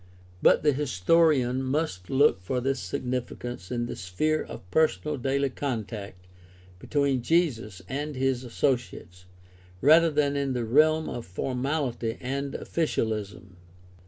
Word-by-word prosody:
But - - +5
the 150 -1 +4
historian 130 - +2
must 130 - -2
look 135 -8 +3
for 125 +8 -2
this 135 +1 -1
significance 120 -1 -4
in 120 -1 -1
the - - -5
sphere 155 +13 -1
of - - -9
personal 155 -1 +1
daily 135 +1 0
contact 110 -8 -5 0.5
between 140 -1 0
Jesus 120 - 0
and 145 +3 -4
his 130 -1 0
associates 115 -8 -2 0.5
rather 160 - +6
than 145 -2 +1
in 140 -2 -1
the 120 -2 -2
realm 155 +6 +3
of 120 - -6
formality 125 - -2
and 140 +2 -3
officialism. 105 - -3
130 Hz, 125 wpm, -27 LUFS, 115-145 Hz, 0.5 s, rather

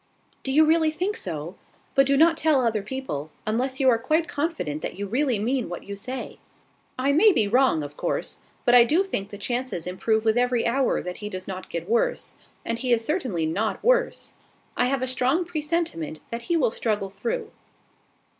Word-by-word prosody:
"Do 265 - -3
you 310 +3 +6
really 320 0 +4
think 370 +7 -2
so? 165 0 -5 0.4
But 275 -2 +4
do 275 0 +3
not 325 +2 +6
tell 315 -4 +3
other 220 -2 +1
people, 200 - -5 0.2
unless 255 +5 -1
you 265 - +3
are 235 -3 +5
quite 310 +7 +1
confident 285 - -2
that - - -4
you 205 - -3
really 250 +3 +1
mean 245 +3 -1
what 175 - -6
you 200 - -6
say." 255 +6 -6 0.6
"I 265 +2 +2
may 385 +9 +6
be 220 - +2
wrong, 245 - +3
of 145 0 -8
course: - - -2 0.3
but 240 - +4
I 245 -1 +9
do 315 +10 +3
think 200 - -4
the 205 - -8
chances 240 -4 -3
improve 220 +5 0
with 220 +2 +3
every 245 -1 +1
hour 260 +3 +1
that 180 0 -5
he 210 - -6
does 185 -2 -7
not 185 -1 -6
get 170 0 -4
worse; 235 - 0 0.3
and 230 0 -2
he 250 0 -1
is 230 -1 +3
certainly 255 - -1
not 200 +8 -1
worse. - - +2 0.4
I - - +2
have 260 0 0
a - - -1
strong 260 +7 +1
presentiment 305 - -2
that 235 0 -3
he 340 - +3
will 250 -8 +2
struggle 210 -4 -1
through." 200 +4 -3
245 Hz, 200 wpm, -25 LUFS, 200-295 Hz, 0.6 s, I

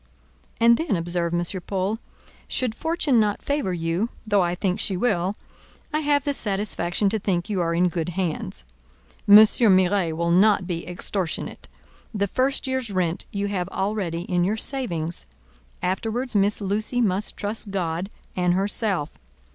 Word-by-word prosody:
"And 235 0 +6
then," 320 - 0
observed 170 0 -1
M. 175 +2 -2
Paul, 195 +3 -1 0.5
"should 250 -4 -1
fortune 300 -3 +1
not 210 -1 +1
favour 285 -9 -1
you, 170 +5 -1 0.2
though 205 -2 +3
I 175 0 0
think 185 0 -1
she 190 - +1
will, 190 -3 0 0.6
I 305 - +2
have 290 -2 +2
the 285 -1 0
satisfaction 200 -4 +1
to 220 +2 -1
think 190 0 -1
you 190 -3 0
are 170 0 0
in 180 +1 +3
good 170 0 -2
hands; 165 - -3 0.6
M. 205 - +9
Miret 195 -5 +5
will 170 +1 0
not 195 +1 +4
be 170 -2 -4
extortionate: 180 0 -3 0.5
the 200 -1 +1
first 260 +8 0
year's 260 -3 -2
rent 180 -3 -1
you 200 0 -2
have 185 -3 -2
already 190 -5 -2
in 180 -1 0
your 205 +5 0
savings; 175 - -3 0.6
afterwards 225 +6 -2
Miss 205 +1 +2
Lucy 215 +5 -1
must 205 -3 0
trust 210 +1 -4
God, 180 -1 -2 0.3
and 180 -1 +2
herself. 195 -4 0
195 Hz, 155 wpm, -24 LUFS, 175-220 Hz, 0.6 s, M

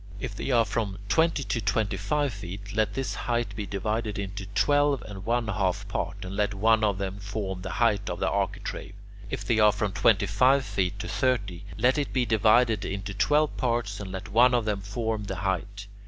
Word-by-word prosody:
If - - -4
they - - -4
are 120 -3 +4
from 100 -2 -2
twenty 160 0 +2
to 115 - -2
twenty 105 0 0
five 140 +7 0
feet, 100 0 -8
let 110 -1 +1
this 135 -1 -2
height 120 -1 -2
be 105 -2 -4
divided 105 +2 -2
into 100 -1 -5
twelve 145 +5 +2
and 100 -3 -8
one 120 0 0
half 100 0 -1
parts, 95 0 -4
and 95 +1 -6
let 105 0 0
one 110 +2 +3
of 100 -3 +2
them 100 0 -4
form 100 -2 -4
the 95 - -5
height 115 -4 +1
of - - -4
the - - 0
architrave. - - -3 0.3
If - - -4
they 110 - +2
are 105 0 +7
from 105 -1 -2
twenty 105 0 +3
five 130 +7 +3
feet 95 +1 -1
to 110 - -5
thirty, 100 -8 -1
let 125 +6 +3
it 145 - -3
be 125 -2 +2
divided 110 0 +3
into 100 +1 -4
twelve 145 +9 +2
parts, 115 -5 -1
and 100 -2 -6
let 95 +3 -6
one 120 +4 +5
of 120 -3 +1
them 105 -2 -1
form 110 +1 -3
the 95 - -4
height. 100 +2 -3
105 Hz, 205 wpm, -27 LUFS, 100-120 Hz, 0.3 s, are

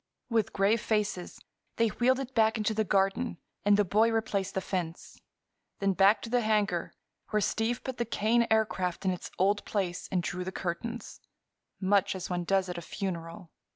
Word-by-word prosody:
With 225 -3 +2
grave 205 +3 +2
faces 210 -5 -1 0.4
they 230 -1 +3
wheeled 255 +5 +2
it 265 -1 -5
back 220 -1 +3
into 215 0 0
the 220 0 +1
garden 195 +3 +1 0.3
and 205 0 +5
the 205 - +3
boy 215 +5 +3
replaced 200 -4 -1
the - - +2
fence. 180 -3 -5 0.6
Then 195 -1 +1
back 195 +3 +4
to 230 - -5
the 245 0 +3
hangar, 210 -6 0 0.3
where 215 - +2
Steve 225 +4 0
put 260 -1 -5
the 235 - 0
Kane 230 +1 +2
Aircraft 205 -5 0
in 190 - +3
its 180 - -5
old 200 +2 +2
place 185 -4 -2
and 180 -2 +1
drew 180 +1 -3
the 190 - -4
curtains—much 195 0 -3
as 185 -1 -5
one 175 -1 -1
does 190 +1 +2
at 175 -1 -4
a - - -8
funeral. 170 -2 -5
200 Hz, 180 wpm, -29 LUFS, 185-225 Hz, 0.6 s, and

